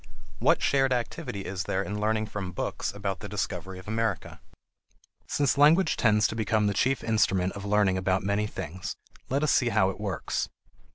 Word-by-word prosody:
What - - +3
shared 135 -1 +3
activity 120 -4 -2
is 95 -2 -4
there 95 +1 0
in 105 +1 -4
learning 110 0 +1
from 95 -4 -5
books - - -3
about 100 -2 -4
the 105 - -7
discovery 95 -2 -4
of 95 - -12
America? 110 -3 -2 0.9
Since 140 -1 +1
language 160 +6 +5
tends 105 -2 +3
to - - -4
become 110 -1 +1
the 100 - +1
chief 130 +6 +1
instrument 95 -4 +1
of 100 0 -7
learning 100 -2 +2
about 95 0 0
many 100 +2 0
things, 90 -1 -6 0.3
let 140 +3 0
us 150 - +3
see 125 - +3
how 95 -4 +3
it 95 - -11
works. 100 -4 -2
105 Hz, 180 wpm, -27 LUFS, 95-110 Hz, 0.9 s, language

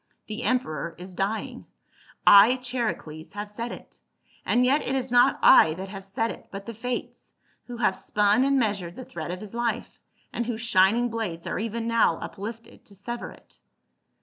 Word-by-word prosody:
The 215 0 -6
emperor 170 - -1
is 180 +1 -10
dying. 200 +4 -3 0.6
I, 205 +5 +8
Charicles, 235 -12 -4
have 205 0 -6
said 230 +3 -5
it; - - -12 0.4
and 245 +1 +2
yet 280 +4 +3
it 265 - -2
is 260 -2 -2
not 245 0 +5
I 155 0 +7
that 190 +2 -7
have 195 -1 -8
said 225 +4 -2
it, - - -11
but 195 0 -8
the 230 - -6
Fates, 245 +3 -5 0.3
who 245 -1 -7
have 210 -5 +2
spun 210 +4 +2
and 275 0 +2
measured 200 -8 -1
the 255 - -8
thread 165 -1 -7
of 180 +1 -5
his 215 -1 -10
life, 235 -1 -3 0.3
and 235 - -2
whose 235 -2 -3
shining 230 +2 +3
blades 200 -8 -4
are - - -3
even 230 +1 -3
now 230 -8 +3
uplifted 225 +3 -8
to 200 - -17
sever 235 +5 -6
it." - - -17
220 Hz, 180 wpm, -26 LUFS, 195-240 Hz, 0.6 s, I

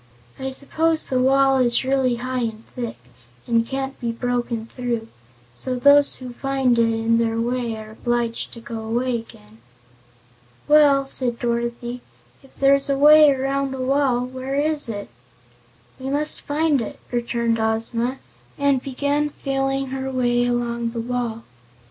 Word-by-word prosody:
I 265 0 -3
suppose 315 +4 0
the 255 - 0
wall 270 +1 +4
is 240 -1 +3
really 260 -2 +1
high 255 +2 -3
and 220 0 -6
thick, 240 - -4 0.5
and 230 -1 +1
can't 270 +1 -4
be 235 -2 -2
broken 240 -1 -2
through, 235 -2 -4 0.4
so 255 - -4
those 285 +3 +5
who 250 -2 -9
find 265 -2 +1
it 230 0 +3
in 225 +1 +1
their 225 0 0
way 240 -1 -1
are 215 0 -9
obliged 235 0 -2
to 235 - -10
go 230 0 -6
away 235 +3 -1
again." 110 - -15 1.1
"Well," 290 -2 +5
said 250 -3 -1
Dorothy, 235 +1 -3 0.4
"if 270 - -21
there's 275 0 +3
a 275 - +2
way 300 +1 +8
around 275 0 0
the 265 - -5
wall, 255 -2 +1
where 260 +1 -5
is 295 -2 -1
it?" 205 -2 -5 0.9
"We 260 +1 -4
must 295 +2 0
find 295 -2 +1
it," 225 - -6
returned 235 -1 0
Ozma, 230 +3 -1 0.4
and 280 -2 +2
began 285 +3 -1
feeling 270 -1 -2
her 265 0 -3
way 245 -2 +1
along 235 -1 -1
the 230 0 -5
wall. 235 -1 -3
250 Hz, 150 wpm, -22 LUFS, 235-275 Hz, 1.1 s, way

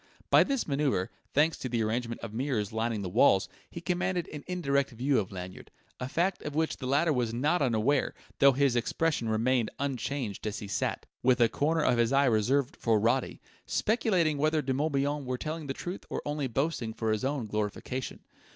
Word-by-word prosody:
By - - +8
this 275 -3 -1
manoeuvre, 140 -10 0 0.2
thanks 155 +3 +2
to 130 - -4
the 115 -2 0
arrangement 115 +2 -2
of 115 -2 -7
mirrors 115 -4 -1
lining 110 -2 -1
the - - -3
walls, 95 +2 +4 0.2
he 170 - -8
commanded 180 0 -1
an 150 -2 -7
indirect 140 -7 0
view 130 +2 +1
of 95 - -4
Lanyard; 90 -1 -8 0.3
a 125 - -4
fact 180 +6 0
of 150 -1 -5
which 160 0 0
the 130 - -5
latter 150 +4 +3
was 120 -3 -1
not 150 +8 +1
unaware, 125 +2 +1 0.2
though 140 -1 +7
his 135 -1 +2
expression 120 +1 0
remained 115 +1 +1
unchanged 130 -5 -3
as 105 0 -3
he 105 - -6
sat 100 - -2 0.2
with 125 0 +3
a 115 -1 +5
corner 155 +2 +1
of 120 - +3
his 115 +1 +3
eye 140 +1 +4
reserved 125 +4 +1
for 115 -2 +2
Roddy 120 +4 0 0.3
speculating 185 -9 +1
whether 155 +1 +2
De 130 0 0
Morbihan 145 0 0
were 130 -1 -3
telling 155 +2 -5
the - - -2
truth 180 +2 -6
or - - -4
only 145 -2 -1
boasting 125 -3 -2
for 110 -1 -1
his 110 +2 -1
own 135 -2 -1
glorification. 105 +5 -4
135 Hz, 195 wpm, -29 LUFS, 115-150 Hz, 0.3 s, By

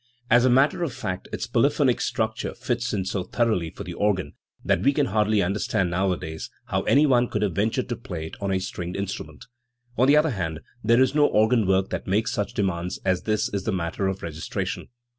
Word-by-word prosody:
As 120 +1 +6
a - - +5
matter 140 +8 +3
of 160 -7 -1
fact 105 -8 -4
its - - -3
polyphonic 130 +2 +2
structure 110 0 -2
fits 120 0 -2
it 95 -3 -1
so 95 0 -2
thoroughly 110 -7 0
for 100 - -8
the 90 -2 -6
organ 95 -6 0 0.3
that - - +2
we 140 - +3
can 145 0 +2
hardly 105 -2 +2
understand 95 0 0
nowadays 90 -3 -2 0.2
how - - -1
anyone 135 -4 +4
could - - -2
have 100 -4 0
ventured 110 +7 0
to 120 - -1
play 90 -10 -6
it 80 - -8
on 100 -1 -1
a 95 - +2
stringed 90 -1 -5
instrument. 100 +5 -5 0.5
On 130 - +5
the 145 +2 +6
other 155 0 +3
hand 80 -7 -3 0.2
there 115 +4 +5
is 130 - 0
no 150 -1 +5
organ 110 0 +3
work 95 0 +2
that - - -4
makes 105 +4 +1
such 105 -3 -2
demands 90 -3 -1
as 95 -1 +2
this 110 -1 +1
in 100 -2 -3
the 110 - -1
matter 90 +1 -1
of 95 0 -3
registration. 80 -1 -4
105 Hz, 210 wpm, -25 LUFS, 95-120 Hz, 0.5 s, As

